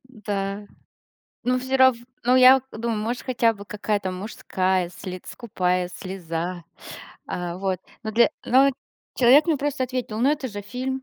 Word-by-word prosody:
Да. 205 -4 -4 0.8
Ну 250 +1 +2
всё 260 +1 -1
рав 260 -2 +6 0.3
ну, 250 +1 +4
я 255 +1 +8
думаю, 225 -1 -2
может, 235 +3 -3
хотя 235 -3 +2
бы 200 -2 -11
какая-то 205 -2 -2
мужская 185 -1 -1
слец 185 0 -8
скупая 180 -6 -1
слеза, 175 -2 -5 0.6
а, 175 -1 -4
вот, 190 -2 -2 0.2
но 220 - -3
для, 235 +2 +5
но 270 +3 +5 0.5
человек 265 +5 +6
мне 325 -3 +2
просто 285 -1 -2
ответил: 250 -4 -4
но 265 +4 +4
это 295 -3 -1
же 205 -2 -6
фильм! 260 +5 -4
220 Hz, 150 wpm, -24 LUFS, 190-255 Hz, 0.8 s, я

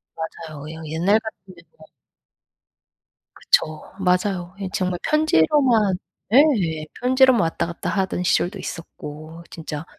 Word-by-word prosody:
맞아요. 160 -2 -7
그냥 160 +1 -8
옛날 180 +8 +2
같으면 190 -5 -11 0.2
뭐 155 0 -16 1.5
그쵸. 155 0 +1 0.2
맞아요. 180 0 0
예, 190 - -3
정말 180 -1 -1
편지로만 245 - +3 0.4
예. 200 - +3
편지로만 260 -1 +4
왔다 165 0 0
갔다 170 - -5
하던 190 -2 -1
시절도 175 0 +1
있었고. 160 0 -8
진짜 160 -1 -6
180 Hz, 250 characters per minute, -22 LUFS, 160-210 Hz, 1.5 s, 편지로만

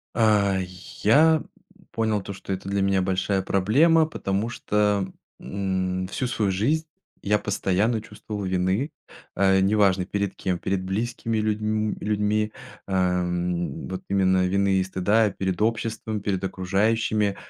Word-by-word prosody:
А, 105 -4 +3
й 90 - -3 0.4
я 155 +5 +6 0.5
понял 110 -3 0
то, 100 - -7
что 95 0 -5
это 95 +1 -5
для 100 0 0
меня 95 -1 +2
большая 95 +1 0
проблема, 140 - +3
потому 105 -7 -2
что, 105 -4 0 0.3
м, 95 -1 -2
всю 125 +6 -2
свою 105 -5 0
жизнь 145 +12 +1 0.4
я 105 +1 +2
постоянно 105 +3 0
чувствовал 105 -2 -7
вины, 95 - 0 0.4
э, 95 0 +4
неважно 95 -2 +3
перед 100 0 -2
кем: 90 -2 -2
перед 95 -1 -1
близкими 115 +3 -2
людьм 110 0 0
людьми, 105 0 0 0.4
эм, 90 -3 -1
вот 95 0 -5
именно 95 -1 +3
вины 100 +1 +2
и 95 - +3
стыда, 100 +4 +2
перед 95 -1 -3
обществом, 110 -1 -2
перед 95 -1 -2
окружающими. 100 +2 0
100 Hz, 135 wpm, -25 LUFS, 95-110 Hz, 0.5 s, я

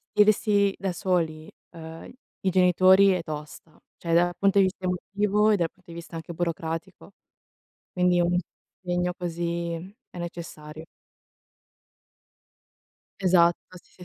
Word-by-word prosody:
gestirsi 205 -1 +3
da 195 -1 -2
soli, 165 -4 -1 0.2
uhm, 165 -1 -10 0.3
i 190 - +1
genitori 185 +2 +5
è 180 -2 -1
tosta; 150 0 -9 0.2
cioè 165 -1 -3
dal 175 +1 +3
punto 195 0 +2
di 195 - +6
vista 185 0 -4
emotivo 205 +3 +1
e 210 - +4
dal 170 -3 0
punto 185 -3 -25
di 165 - -9
vista 170 0 -10
anche 165 +1 -7
burocratico. 170 +3 -4 0.8
Quindi 180 -1 +2
è - - +4
un 175 +1 +1 0.4
impegno 180 0 -1
così 170 -1 -3 0.4
è 175 - -10
necessario. 160 -2 -8 2.4
Esatto 175 -1 +2
sì, 180 - -16
175 Hz, 130 wpm, -26 LUFS, 165-190 Hz, 2.4 s, di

